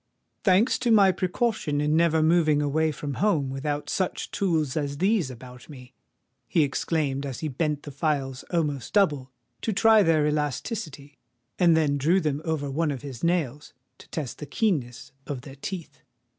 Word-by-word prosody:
"Thanks 195 +4 +3
to 250 - 0
my 200 -4 +6
precaution 185 - -1
in 150 +1 +1
never 160 -1 +3
moving 155 -2 +3
away 155 +2 +1
from 145 -1 -5
home 160 -11 +2
without 145 +2 -3
such 185 +3 -2
tools 160 -9 0
as 145 -2 -2
these 190 -4 +1
about 125 +1 -12
me!" 130 -3 -12 0.5
he 160 +6 +3
exclaimed, 140 -1 -1
as 135 -4 -5
he 160 - -2
bent 150 +1 -2
the 145 - -8
files 135 -2 -2
almost 150 -7 -2
double 145 -10 +2 0.3
to 225 - -1
try 220 +1 +5
their 160 -5 +3
elasticity, 150 - -3 0.4
and 170 -3 +5
then 145 -3 +1
drew 165 +7 +3
them 150 -4 -1
over 150 -4 -2
one 160 +3 0
of 135 -4 -4
his 135 -5 -8
nails 150 -5 -1 0.2
to - - -16
test 145 -6 -5
the 150 - -7
keenness 140 - -1 0.2
of 135 -4 -4
their 135 +1 -11
teeth. 175 +3 -7
150 Hz, 170 wpm, -26 LUFS, 140-170 Hz, 0.5 s, my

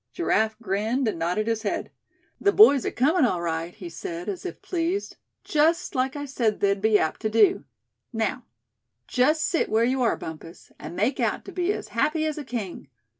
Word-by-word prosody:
Giraffe 220 -10 +1
grinned, 220 +5 -1
and 210 - -2
nodded 180 +6 0
his 225 -1 -1
head. 205 - -3 0.5
"The 400 - +3
boys 285 - +6
are - - -1
comin' 300 +6 +2
all 185 -8 +2
right," 165 0 -2
he 180 - -9
said, 170 +1 -6
as 195 - -4
if - - -8
pleased; 355 +3 -2 0.3
"just 325 +3 +1
like 265 0 0
I 290 0 -4
said 235 -6 -1
they'd 200 -1 +1
be 215 0 +4
apt 160 - -1
to 215 - 0
do. 215 -1 +3 0.5
Now, 225 +3 -2 0.6
just 300 +5 +2
sit 335 - 0
where 220 +1 +2
you 260 +2 0
are, 235 - +2
Bumpus, 160 +1 -10
and - - -8
make 225 +9 0
out - - -1
to - - -8
be 360 +1 0
as - - -5
happy 310 +1 0
as 310 -1 -2
a - - -5
king. 225 - -5
230 Hz, 195 wpm, -25 LUFS, 200-295 Hz, 0.6 s, boys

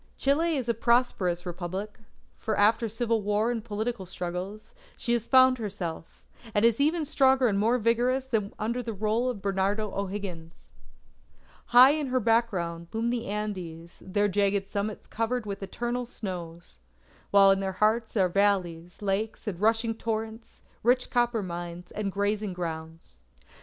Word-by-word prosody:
Chile 315 +4 +2
is 255 -3 -3
a 235 - +2
prosperous 220 -7 +1
Republic; 185 +4 -5 0.4
for 220 -1 -3
after 220 +2 +3
civil 225 0 0
war 210 +3 +1
and 230 -3 -3
political 220 -2 -3
struggles, 185 +4 -5 0.2
she 235 - -1
has 235 -1 -1
found 260 -1 +6
herself, 190 -7 -6 0.3
and 205 +2 +4
is 230 +1 +3
even 310 +2 +2
stronger 265 -3 +4
and 200 -3 +1
more 230 +4 +3
vigorous 245 +3 +1
than 225 -5 0
when 200 - -12
under 235 +3 -2
the 230 -3 -5
rule 220 +5 0
of 215 -6 -5
Bernardo 200 +2 0
O'Higgins. 190 -4 -6 0.9
High 250 +3 +8
in 300 -1 -1
her 255 0 +1
background 200 -8 0
loom 230 +2 0
the 240 -2 -3
Andes, 185 -5 -5
their 205 +2 +1
jagged 200 0 +1
summits 205 +1 -3
covered 230 +1 -2
with 200 -1 -5
eternal 240 +5 -3
snows; 175 - -7 0.5
while 195 -1 +7
in 195 - +2
their 190 -1 -2
hearts 220 +3 +1
are 190 -2 +4
valleys, 180 -2 0
lakes, 205 +4 -2
and 195 -6 -4
rushing 225 +2 +2
torrents, 225 0 -5 0.2
rich 250 +2 +2
copper 240 -3 +1
mines, 175 0 -6
and 205 -2 -3
grazing 205 0 -1
grounds. 160 - -7
210 Hz, 155 wpm, -27 LUFS, 190-235 Hz, 0.9 s, High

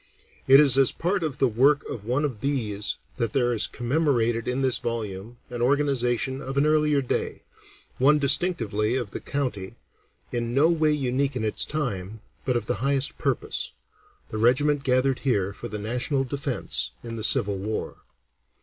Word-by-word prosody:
It 135 +1 +8
is 135 -3 +5
as 135 - +5
part 185 +3 -1
of 155 -4 -3
the 135 - +3
work 135 +6 +3
of 105 -3 -7
one 130 +6 0
of 125 -7 -4
these 110 -7 -1 0.2
that 115 -3 -1
there 120 -2 +2
is 110 - 0
commemorated 120 -4 0
in 125 +2 -1
this 130 -1 +2
volume 110 -1 -5
an 120 -1 -4
organization 130 -1 +1
of 135 +1 -5
an 140 - +3
earlier 150 -2 +2
day, 125 - -3 0.6
one 145 +4 +5
distinctively 120 - +2
of 120 -6 -3
the - - -5
county, 125 -10 -4 0.6
in 120 0 -2
no 150 +4 +5
way 155 -2 +2
unique 135 -1 0
in 125 - -2
its 110 - +1
time, 110 -9 -4 0.2
but 125 -2 +1
of - - -3
the 125 - -2
highest 140 0 0
purpose - - -2 0.6
the 110 - -3
regiment 140 +5 +3
gathered 130 -1 +2
here 100 -8 0
for - - -7
the 105 - -5
national 125 +6 -1
defence 135 -3 -2
in 115 -1 -6
the 110 - -5
Civil 100 -3 +2
War. 105 +3 -4
125 Hz, 170 wpm, -25 LUFS, 115-140 Hz, 0.6 s, It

